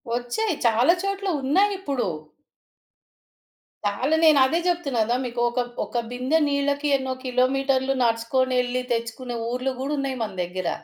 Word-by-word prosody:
ఒచ్చాయి. 245 - -1
చాలా 235 +7 +5
చోట్ల 395 0 -2
ఉన్నాయిప్పుడు. 340 - +1 1.8
చాలా 250 +10 +1
నేనదే 310 -1 +5
జెప్తున్నా 295 -9 0
గదా! 235 +3 0
మీకొక 240 0 -1 0.3
ఒక 240 - -2
బిందె 255 +6 +1
నీళ్ళకి 285 +1 0
ఎన్నో 265 -1 -3
కిలోమీటర్లు 265 +1 +1
నడసుకొనెళ్లి 250 +2 +1
తెచ్చుకునే 235 +1 -4
ఊర్లు 255 +2 -1
గూడా 285 +3 -1
ఉన్నాయి 270 -1 -2
మన 215 - -4
దెగ్గర. 180 0 -3
260 Hz, 115 wpm, -24 LUFS, 240-285 Hz, 1.8 s, చాలా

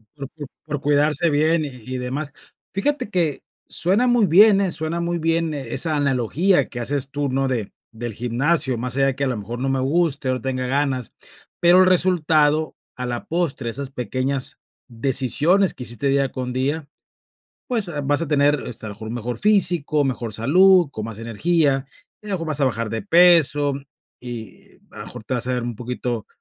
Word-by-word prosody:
Por 140 -2 -7
por 145 -3 -8 0.2
por 150 -2 -4
cuidarse 150 +4 +2
bien 155 +2 +2
y - - -5
y 130 0 -7
demás. 135 +4 -4 0.4
Fíjate 285 +5 -1
que 170 -8 -1 0.3
suena 200 +8 +1
muy 240 -4 +3
bien, 200 +4 +6
eh, 190 -3 0
suena 160 +2 -2
muy 170 0 -2
bien 165 0 0
esa 145 +3 +1
analogía 145 - +1
que 120 - -7
haces 135 +2 -1
tú, 145 0 -2
¿no? 135 +1 0
de 120 -6 -3 0.2
del 115 0 -6
gimnasio, 125 +4 +1
más 125 +1 -3
allá 135 -1 +2
que 140 - -3
a - - +1
lo 125 -3 -2
mejor 110 +4 -6
no 135 - -2
me 135 0 0
guste 145 0 0
o - - +2
no 125 - -6
tenga 130 0 -3
ganas, 135 -2 -1 0.5
pero 175 +1 +5
el 185 - +5
resultado 160 -4 +3 0.2
a 125 - -5
la 120 -1 -4
postre, 160 -8 -2
esas 135 +3 -4
pequeñas 130 +2 -2 0.3
decisiones 135 - +1
que 125 - -9
hiciste 120 +4 -4
día 135 -1 +1
con 125 -1 -5
día, 140 +4 -2 0.8
pues, 225 -6 -1
eh, 175 - -7
vas 145 +3 0
a 165 - -3
tener, 145 -1 +2
este, 110 - -8
a - - -5
lo - - -7
mejor 110 +1 -8
mejor 120 0 -4
físico, 175 -8 +3
mejor 125 -5 -3
salud, 175 - +4
con 110 -4 -6
más 110 -2 -8
energía, 135 +4 0 0.3
y 210 - -13
a - - -7
lo 195 - 0
mejor 165 -3 -5
vas 150 -2 +2
a - - +4
bajar 115 -3 -2
de 115 - -3
peso, 165 -6 +4 0.5
y 115 -5 -9 0.2
a - - -12
lo - - -7
mejor - - -9
te 130 - -4
vas 125 -1 +1
a 130 - 0
dar 125 -1 -2
un 120 -1 -4
poquito, 120 -1 -4
140 Hz, 200 wpm, -21 LUFS, 125-165 Hz, 0.8 s, bien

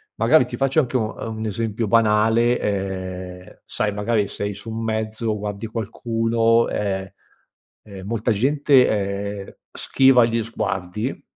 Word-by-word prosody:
magari 155 -5 +4
ti 120 - -7
faccio 135 +3 +2
anche 130 -1 -1
un 110 -3 -1
uhm, 110 -1 -5
un 110 - -4
esempio 110 +1 -2
banale: 115 +2 +3
ehm, 95 -2 -5
sai, 105 -1 -2
magari 105 0 0
sei 100 +1 -4
su 100 +3 -10
un 115 0 -4
mezzo, 110 0 -2
guardi 105 +1 -5
qualcuno, 115 +1 +1
ehm 95 -2 -2 0.7
ehm, 100 -2 -10
molta 115 +1 0
gente, 135 +3 +3
ehm, 100 -1 -3 0.2
schiva 130 -3 +4
gli 115 0 0
sguardi 105 +1 -4
110 Hz, 135 wpm, -22 LUFS, 100-115 Hz, 0.7 s, magari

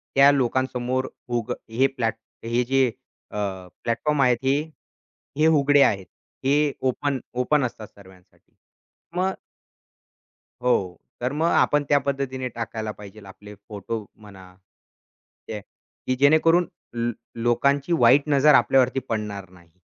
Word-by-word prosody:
त्या 140 +1 +7
लोकांसमोर 130 -1 0 0.2
उग 120 -3 -2 0.2
हे 125 +4 +2
प्लॅट 115 -3 0 0.3
हे 120 +2 +1
जे 135 +2 +2 0.5
अ, - - -6 0.5
प्लॅटफॉर्म 145 +5 0
आहेत, 125 -2 +4
हे 135 +1 +3 0.8
हे 155 +1 +4
उघडे 145 -2 +4
आहेत. 100 -7 +2 0.4
हे 145 +1 +2 0.2
ओपन 140 +1 -2 0.2
ओपन 145 +3 +2
असतात 110 -3 -7
सर्वांसाठी. 95 -2 -20 0.6
मग 190 +1 +1 1.3
हो, 125 0 +3 0.5
तर 125 +1 -1
मग 160 +3 +1
आपण 150 0 +3
त्या 145 - +5
पद्धतीने 135 -2 -3
टाकायला 115 -2 -5
पाहिजे 105 0 -13
आपले 105 +2 -12
फोटो 105 +1 -5
म्हणा. 95 -3 -15
ठीक 95 0 -35 0.7
आहे, 105 - -5 0.5
की 130 - +1
जेणेकरून 165 +4 +4 0.3
ल 120 0 -1 0.3
लोकांची 140 +6 +1
वाईट 135 +5 +5
नजर 145 +1 +5
आपल्यावरती 135 0 +3
पडणार 105 -3 -4
नाही. 85 -1 -21
125 Hz, 125 wpm, -24 LUFS, 110-140 Hz, 1.3 s, त्या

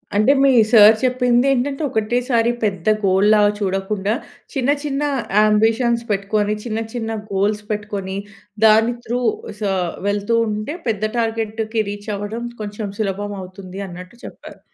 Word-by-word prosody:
అంటే, 215 +6 +4
మీ 275 - +6 0.2
సార్ 215 -2 +9
చెప్పింది 250 -1 +2
ఏంటంటే, 275 +3 -1
"ఒకటేసారి 235 +1 +1
పెద్ద 195 -4 -2 0.2
గోల్‌లాగా 205 +2 +4
చూడకుండా, 195 +1 -1 0.4
చిన్న 270 -2 0
చిన్న 285 -1 -2 0.4
యాంబిషన్స్ 225 +3 +3
పెట్టుకొని, 205 +1 0
చిన్న 225 -2 -2
చిన్న 225 -2 -3 0.2
గోల్స్ 205 +2 0
పెట్టుకొని, 205 -2 -4 0.5
దాని 220 +2 +5
త్రూ 245 +2 -2 0.4
సా 200 - 0 0.4
వెళ్తూ 205 +3 0
ఉంటే, 215 +8 -3
పెద్ద 215 -2 -1
టార్గెట్‌కి 225 -1 -1
రీచ్ 205 +1 -7
అవ్వడం 215 +4 -5 0.2
కొంచెం 210 0 -5
సులభం 205 0 -2
అవుతుంది." 185 0 -9
అన్నట్టు 180 +4 -10
చెప్పారు. - - -11
215 Hz, 125 wpm, -20 LUFS, 205-235 Hz, 0.5 s, సార్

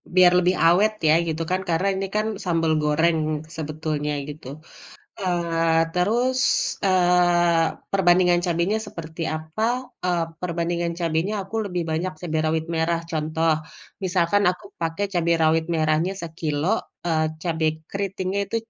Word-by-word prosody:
biar 180 -1 +7
lebih 180 +1 +2
awet 195 +6 +5 0.2
ya 155 - +6
gitu 160 0 -2
kan. 185 +1 +1
Karena 170 +4 +1
ini 195 0 -2
kan 215 - +1 0.2
sambal 165 -2 +1
goreng 160 +2 +2 0.4
sebetulnya 155 -1 -3 0.2
gitu. 145 -3 -9 0.7
Eee, 165 -3 +1
terus, 240 +8 +1 0.5
eee, 175 -2 +4 0.3
perbandingan 180 -2 +4
cabenya 175 +5 +1
seperti 165 -1 -8
apa? 155 +7 -5 0.4
Eee, 175 -2 +1 0.2
perbandingan 170 0 -1
cabenya 165 +4 0
aku 220 - -8
lebih 180 -3 -2
banyak 175 +4 -1
cabe 160 -3 -2
rawit 160 0 0
merah. 165 +1 +1
Contoh, 160 +1 0 0.5
misalkan 185 +2 +2
aku 180 - -5 0.2
pakai 165 +5 -1
cabe 170 -1 +1
rawit 160 0 +3
merahnya 155 +4 +1
sekilo, 160 -2 -3 0.4
eee, 160 -2 +2 0.2
cabe 165 -2 0 0.2
kriting 195 -2 -3
itu 200 +3 -4
170 Hz, 130 wpm, -23 LUFS, 160-180 Hz, 0.7 s, biar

